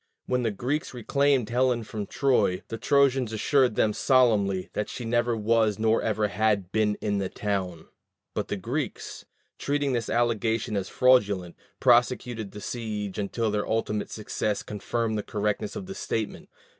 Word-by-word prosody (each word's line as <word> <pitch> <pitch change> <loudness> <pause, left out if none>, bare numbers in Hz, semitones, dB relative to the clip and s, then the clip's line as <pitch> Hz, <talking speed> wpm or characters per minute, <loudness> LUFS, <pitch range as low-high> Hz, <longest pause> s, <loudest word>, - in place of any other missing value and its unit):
When 125 0 0
the 115 - +1
Greeks 130 +7 -3
reclaimed 135 0 +1
Helen 125 -1 +2
from 105 -2 -5
Troy, 130 -9 +1
the 115 - -5
Trojans 135 -4 +3
assured 125 +2 +2
them 105 - +2
solemnly 105 -9 +2
that 105 - -2
she 120 - -6
neither 120 0 +1
was 110 -1 +2
nor 110 +1 +2
ever 110 -1 0
had 100 -3 0
been 105 -1 +2
in 100 -1 0
the 95 -1 -2
town; 95 -5 -3 0.5
but - - -2
the - - -3
Greeks, - - -4 0.3
treating 145 -1 0
this 115 -3 -1
allegation 115 -2 0
as 100 -2 -2
fraudulent, 105 -9 +3 0.2
prosecuted 120 -3 +2
the 105 +2 -10
siege 105 -4 -4
until 110 +2 -1
their 105 0 -1
ultimate 105 -2 -1
success 105 -1 -2
confirmed 110 +1 -2
the - - -1
correctness 105 0 -2
of 200 - -5
the 195 - -7
statement. 110 - -4
110 Hz, 155 wpm, -26 LUFS, 105-125 Hz, 0.5 s, Trojans